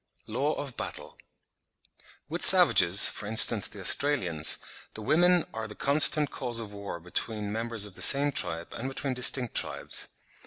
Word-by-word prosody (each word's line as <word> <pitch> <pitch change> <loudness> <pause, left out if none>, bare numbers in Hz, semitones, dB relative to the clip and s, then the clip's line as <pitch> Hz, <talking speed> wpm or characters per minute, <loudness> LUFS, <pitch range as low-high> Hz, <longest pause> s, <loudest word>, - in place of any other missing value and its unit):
LAW 145 +3 -4
OF 140 -4 -10
BATTLE. - - -10 1.1
With - - -7
savages, 90 +3 +7
for 105 - -6
instance, 110 +1 +3
the - - -14
Australians, 90 - 0 0.4
the 110 - -10
women 175 +6 0
are 110 0 -8
the 105 - -14
constant 145 +1 +1
cause 120 -3 -6
of 105 -3 -10
war 100 -4 -10
both 90 +2 -19
between 105 -3 -3
members 115 -1 -3
of 105 - -14
the - - -12
same 145 +1 +5
tribe 85 -9 -5
and 130 - -8
between 135 0 -5
distinct 125 -1 0
tribes. - - -4
115 Hz, 160 wpm, -25 LUFS, 100-140 Hz, 1.1 s, savages